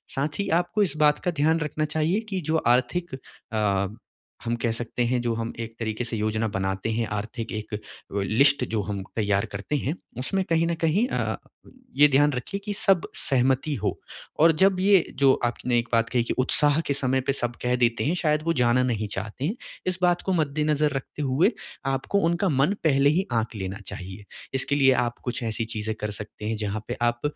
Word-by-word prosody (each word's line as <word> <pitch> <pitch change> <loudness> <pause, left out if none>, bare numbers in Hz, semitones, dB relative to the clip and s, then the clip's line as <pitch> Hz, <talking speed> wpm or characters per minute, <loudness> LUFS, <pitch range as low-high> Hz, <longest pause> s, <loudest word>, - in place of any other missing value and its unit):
साथ 145 +5 -2
ही 200 - -1
आपको 205 +4 0
इस 155 -5 -1
बात 150 0 +4
का 180 - +2
ध्यान 160 +2 +3
रखना 155 0 -1
चाहिए 160 +6 0
कि 190 -3 -2
जो 160 - +3
आर्थिक 130 +7 +1 0.4
अ, 100 -3 +1 0.6
हम 115 - 0
कह 115 0 -1
सकते 120 +1 -2
हैं, 125 +1 +1
जो 120 -1 0
हम 115 0 -3
एक 115 0 -5
तरीके 110 +1 -2
से 120 -1 -3
योजना 110 +1 0
बनाते 95 0 -2
हैं, 115 0 -1
आर्थिक 110 +3 -4
एक 110 -1 -6
अ, - - -2 0.5
लिस्ट 130 +6 +3
जो 110 -2 0
हम 100 0 -4
तैयार 100 -2 +1
करते 100 +9 -3
हैं, 145 +4 -2 0.2
उसमें 190 +9 0
कहीं 165 0 +2
न 170 - 0
कहीं 195 +10 +3
अ, - - -1 0.6
ये 150 +1 +7
ध्यान 145 +1 +4
रखिए 130 +11 -4
कि 205 - -2
सब 195 -3 +3
सहमति 135 +3 +1
हो, 105 -4 -2 0.4
और 165 +2 +7
जब 190 +4 +3
ये 195 -3 +5 0.2
जो 135 -1 +6
आपने 120 +1 0
एक 120 - -4
बात 115 0 +3
कही 120 -1 +1
कि - - -2
उत्साह 145 +3 +3
के 140 - +2
समय 130 -1 +1
पे 135 +1 0
सब 120 -3 -2
कह 125 0 +2
देते 120 -2 +1
हैं, 155 - +2
शायद 155 -3 +1
वो 165 - +1
जाना 125 -2 +3
नहीं 110 -4 -1
चाहते 105 +6 -4
हैं, 200 - -1 0.3
इस 185 0 0
बात 175 -1 +3
को 190 - +1
मद्देनज़र 150 -1 +1
रखते 135 +2 -5
हुए 140 - +3 0.3
आपको 135 +9 0
उनका 170 +3 +1
मन 145 +7 +2
पहले 140 -2 +4
ही 180 +5 +1
आँक 115 0 -1
लेना 95 -1 -4
चाहिए। 95 +3 -7 0.3
इसके 135 +2 0
लिए 135 -2 +5
आप 120 -1 0
कुछ 125 0 -2
ऐसी 115 0 -2
चीज़ें 110 0 -3
कर 105 0 -2
सकते 105 +1 -8
हैं, 110 - -1
जहाँ 105 0 -3
पे 120 - -4
आप 120 0 +1
130 Hz, 210 wpm, -25 LUFS, 115-155 Hz, 0.6 s, ये